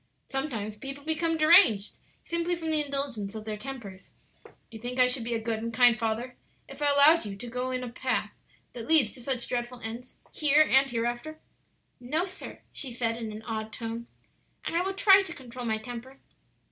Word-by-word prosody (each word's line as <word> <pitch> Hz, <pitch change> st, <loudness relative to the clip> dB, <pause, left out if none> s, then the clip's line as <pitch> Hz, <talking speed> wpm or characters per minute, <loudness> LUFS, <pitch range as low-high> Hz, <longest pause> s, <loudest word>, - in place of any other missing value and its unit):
"Sometimes 235 Hz, -7 st, -3 dB
people 275 Hz, +5 st, -7 dB
become 325 Hz, +1 st, 0 dB
deranged 310 Hz, -, +6 dB, 0.3 s
simply 335 Hz, +1 st, -1 dB
from 325 Hz, -2 st, -3 dB
the 305 Hz, -1 st, +2 dB
indulgence 275 Hz, -8 st, -2 dB
of 215 Hz, -1 st, -7 dB
their 215 Hz, -1 st, -3 dB
tempers. 210 Hz, -5 st, -9 dB, 0.3 s
Do -, -, -16 dB, 0.2 s
you 220 Hz, -, -9 dB
think 245 Hz, +2 st, -5 dB
I 255 Hz, -, +6 dB
should 250 Hz, -1 st, 0 dB
be 235 Hz, 0 st, -2 dB
a -, -, -1 dB
good 225 Hz, 0 st, -2 dB
and 230 Hz, +1 st, -4 dB
kind 240 Hz, 0 st, +6 dB
father 230 Hz, +3 st, -2 dB, 0.3 s
if -, -, -10 dB
I 290 Hz, -, +3 dB
allowed 285 Hz, +4 st, +6 dB
you 205 Hz, -2 st, -6 dB
to 220 Hz, +5 st, -8 dB
go 250 Hz, +2 st, -3 dB
on 255 Hz, -, -2 dB
in 255 Hz, -, -3 dB
a 250 Hz, -, -5 dB
path 255 Hz, +1 st, -1 dB, 0.4 s
that 230 Hz, -2 st, -7 dB
leads 310 Hz, -9 st, +4 dB
to 255 Hz, -, -9 dB
such 250 Hz, -1 st, -3 dB
dreadful 245 Hz, 0 st, -3 dB
ends 230 Hz, +3 st, -7 dB, 0.2 s
here 300 Hz, 0 st, +5 dB
and 270 Hz, +1 st, +4 dB
hereafter?" 240 Hz, +6 st, -3 dB, 0.6 s
"No, 300 Hz, +8 st, -1 dB
sir," 380 Hz, 0 st, -9 dB
she 265 Hz, -, -5 dB
said 230 Hz, -1 st, 0 dB
in 225 Hz, -2 st, -5 dB
an 215 Hz, +1 st, -8 dB
awed 220 Hz, -1 st, -4 dB
tone; 230 Hz, +1 st, -5 dB, 0.6 s
"and -, -, -3 dB
I 340 Hz, -, +3 dB
will 385 Hz, +1 st, -2 dB
try 390 Hz, 0 st, +7 dB
to 375 Hz, -3 st, -6 dB
control 250 Hz, -3 st, -8 dB
my 220 Hz, -1 st, +1 dB
temper." 245 Hz, +4 st, -9 dB
250 Hz, 205 wpm, -28 LUFS, 230-290 Hz, 0.6 s, try